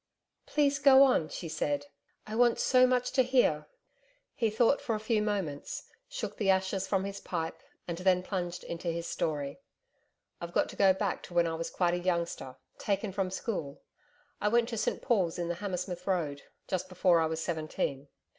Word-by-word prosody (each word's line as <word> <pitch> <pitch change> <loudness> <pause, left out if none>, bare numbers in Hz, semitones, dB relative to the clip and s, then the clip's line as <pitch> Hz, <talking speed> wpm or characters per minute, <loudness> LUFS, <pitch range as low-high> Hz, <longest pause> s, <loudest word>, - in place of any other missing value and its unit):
'Please 285 -2 +2
go 275 -1 +8
on,' 250 - +3
she 170 - -6
said, 145 -2 -1 0.4
'I 215 - -6
want 240 -1 +4
so 255 0 +5
much 250 0 +1
to 260 - +4
hear.' 245 - +2 0.7
He 225 -2 +1
thought 230 +6 +3
for 225 - -1
a - - -3
few 215 0 +1
moments, 195 -9 -3 0.2
shook - - -5
the 200 -3 0
ashes 190 0 +1
from 195 -2 +1
his 200 0 -5
pipe 165 -4 -4 0.3
and 170 -1 -4
then 180 -1 +3
plunged 180 -2 -3
into 170 +1 -6
his 170 0 -2
story. 145 - -2 0.8
'I've 170 0 -6
got - - +2
to - - -9
go 195 -1 +5
back 190 0 -1
to 175 - -11
when 170 0 +4
I 165 - -1
was 165 +1 -3
quite 175 -2 +1
a 175 - 0
youngster 170 -7 -2 0.2
taken 200 0 -1
from 190 -1 -1
school 185 -7 -4 0.6
I 210 - +2
went 235 +2 +3
to 230 - -4
St 215 - -1
Paul's 185 -8 +1
in 170 -1 -2
the 175 - -1
Hammersmith 180 -2 -4
Road 155 -7 -1 0.3
just 185 0 -2
before 180 -1 +3
I 160 - +2
was 160 0 -3
seventeen. 155 -4 -3
185 Hz, 190 wpm, -30 LUFS, 170-215 Hz, 0.8 s, go